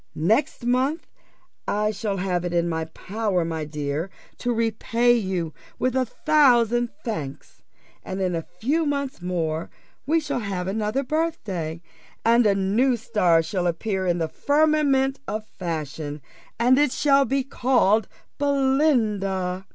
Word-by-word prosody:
Next 225 - +1
month 260 +6 +1 0.6
I 210 +1 +1
shall 205 -1 -3
have 180 -2 -1
it 175 -1 -3
in 170 0 +2
my 160 -1 -2
power, 190 +2 -2
my 160 -2 -3
dear, 150 +3 -3 0.3
to 245 - -1
repay 230 +1 +2
you 185 -8 -1 0.2
with 255 0 0
a 260 -1 +1
thousand 240 -5 +3 0.2
thanks; 150 - -6 0.4
and 190 +1 -5
in 185 -2 0
a 165 - -1
few 265 - -1
months 280 -6 -2
more 165 -3 -2 0.4
we 325 +3 +3
shall 300 - -3
have 195 -5 -3
another 215 +6 -1
birthday, 215 - -2 0.4
and 230 0 +5
a 200 - +3
new 220 +7 +2
star 180 -7 +2
shall 180 +2 -1
appear 190 +2 -1
in 175 -1 +2
the 165 -2 -1
firmament 285 - +2
of 215 0 -3
fashion, 155 -5 -5 0.4
and 250 +3 +4
it 295 -3 +3
shall 280 0 +4
be 270 0 0
called 240 -5 +2 0.3
Belinda. 220 -10 +1
215 Hz, 140 wpm, -24 LUFS, 180-260 Hz, 0.6 s, and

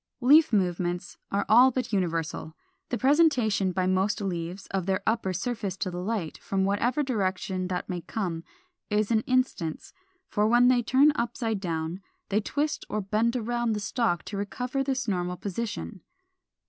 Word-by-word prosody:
469. 260 +5 +7
=Leaf 215 - +4
movements= 175 +1 -4
are 200 0 0
all 245 +4 +7
but 250 -3 -3
universal. 165 -4 -2 0.3
The 245 - -1
presentation 260 - +3
by 185 +1 0
most 190 +3 +1
leaves 180 -1 -4
of 195 -2 -2
their 190 -1 0
upper 220 -4 0
surface 200 0 -3
to 185 - -2
the 175 - -5
light, 195 -5 -3
from 190 -1 -1
whatever 240 +9 +1
direction 190 -6 -1
that 180 -1 -3
may 180 -2 -3
come, 170 -5 -3 0.5
is 210 +1 +1
an 220 -1 +3
instance; 255 -11 -1 0.3
for 210 +1 +1
when 245 +1 +5
turned 275 +5 +5
upside 235 -4 -2
down 165 0 -3 0.3
they 205 +2 +2
twist 295 +7 -2
or 215 - -1
bend 215 +4 0
round 240 -1 -2 0.2
on - - +2
the 210 - -2
stalk 205 -4 0
to 205 - -5
recover 250 +7 -2
this 260 -3 -2
normal 180 -2 -1
position. 200 - -5
205 Hz, 165 wpm, -27 LUFS, 185-240 Hz, 0.5 s, 469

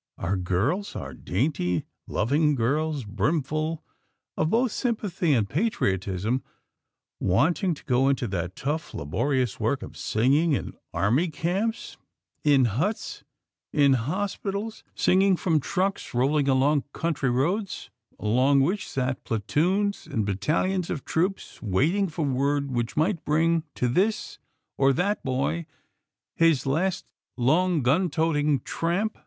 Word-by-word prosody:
_ - - -9
Our 95 +3 +1
girls, 105 - -1
our 70 0 -6
dainty, 90 - -1 0.2
loving 145 +7 +2
girls, 145 +3 0
brimful 155 - -1 0.5
of 155 - +1
both 235 +4 +2
sympathy 205 - -1
and 110 -6 +2
patriotism, 100 - 0 0.8
wanting 165 - +2
to - - -15
go 130 +1 +3
into 135 -3 0
that 90 -1 -3
tough, 150 +4 -3
laborious 125 - -1
work - - 0
of - - -9
singing 140 +9 +2
in 135 - -2 0.2
army 125 - +2
camps; 180 +9 -2 0.5
in 140 -4 +5
huts; 155 - -2 0.5
in 140 -2 +4
hospitals; 200 - -3
singing 190 +1 +4
from 165 -4 +2
trucks 190 +1 -2
rolling 140 +3 +2
along 140 +2 +3
country 150 -6 -1
roads 175 - -1 0.3
along 130 +6 +3
which 185 +9 0
sat 130 0 -2
platoons 180 - 0
and 110 -3 -1
battalions 160 - 0
of 145 - -4
troops, 185 +4 -2
waiting 150 - +1
for 160 -2 -3
word 140 +1 0
which 120 0 -2
might 165 +2 +1
bring 165 +2 +2
to 125 - 0
this 195 - 0 0.4
or 135 0 +5
that 200 +7 0
boy 140 +5 -1 0.7
his 165 -6 +3
last 180 +7 0 0.3
long 155 +5 +2
gun 160 +9 +3
toting 150 -3 +1
tramp. 185 +6 -2
150 Hz, 125 wpm, -26 LUFS, 125-175 Hz, 0.8 s, in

